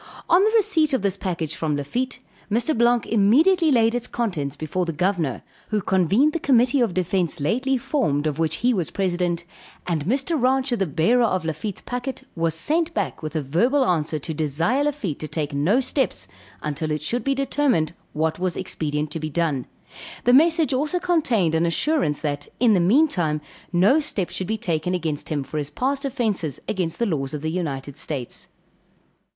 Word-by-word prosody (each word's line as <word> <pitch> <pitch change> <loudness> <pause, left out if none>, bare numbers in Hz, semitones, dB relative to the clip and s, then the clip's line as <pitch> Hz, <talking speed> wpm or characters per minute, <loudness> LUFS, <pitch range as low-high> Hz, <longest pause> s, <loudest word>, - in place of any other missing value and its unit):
On 355 +3 +5
the 425 - +4
receipt 365 -9 +3
of 260 - +1
this 200 -2 +1
packet 175 -6 -3
from 155 -2 -1
Lafitte, 245 - -3 0.3
Mr. 235 +9 +1
Blanque 235 -1 +3
immediately 305 - +4
laid 230 -3 +4
its 245 0 -2
contents 165 - -2
before 155 +4 -2
the - - 0
governor, 170 -5 -1 0.3
who 215 - +1
convened 195 - +2
the 335 - -1
committee 260 -1 +3
of 225 -7 +1
defence 180 -2 0
lately 255 - +1
formed 215 - 0
of 155 0 -1
which 160 -1 +1
he 250 - +4
was 180 -7 -1
president; 175 -3 -1 0.4
and 160 -4 -1
Mr. 270 - 0
Rancher 260 0 +2
the 195 -4 -1
bearer 170 - +2
of 185 -6 -1
Lafitte's 180 +5 -4
packet, 255 +2 -5
was 165 -2 0
sent 320 - 0
back - - -2
with 155 0 -6
a 155 - 0
verbal 240 - +2
answer 160 -4 0
to 155 +2 -5
desire 165 - +1
Lafitte 265 - -2
to 155 - -5
take 150 -2 -3
no 160 - +2
steps 270 +1 -1 0.4
until 150 +1 -2
it 150 -1 -2
should 240 +9 -1
be 275 0 +1
determined 270 - +1 0.2
what 160 +2 -1
was 185 -1 -1
expedient 150 -4 -2
to 165 - -3
be 155 0 -4
done; 150 -5 -1 0.6
the 245 - +4
message 320 0 +4
also 300 +7 0
contained 250 - +1
an 165 +1 +2
assurance 170 - 0
that, 145 -2 -3
in 235 -2 +5
the 190 - +4
meantime 175 - +2 0.3
no 190 - +4
steps 215 - -2
should 185 - -3
be 220 - -1
taken 175 -1 -1
against 155 -4 -3
him 145 -3 -1
for 155 +3 -4
his 145 -1 -3
past 270 - -1
offences 210 - -1
against 180 -5 -2
the 235 - +1
laws 150 -7 -2
of 150 - -6
the 160 - -1
United 145 -6 -4
States. 135 -6 -4
185 Hz, 185 wpm, -23 LUFS, 155-255 Hz, 0.6 s, On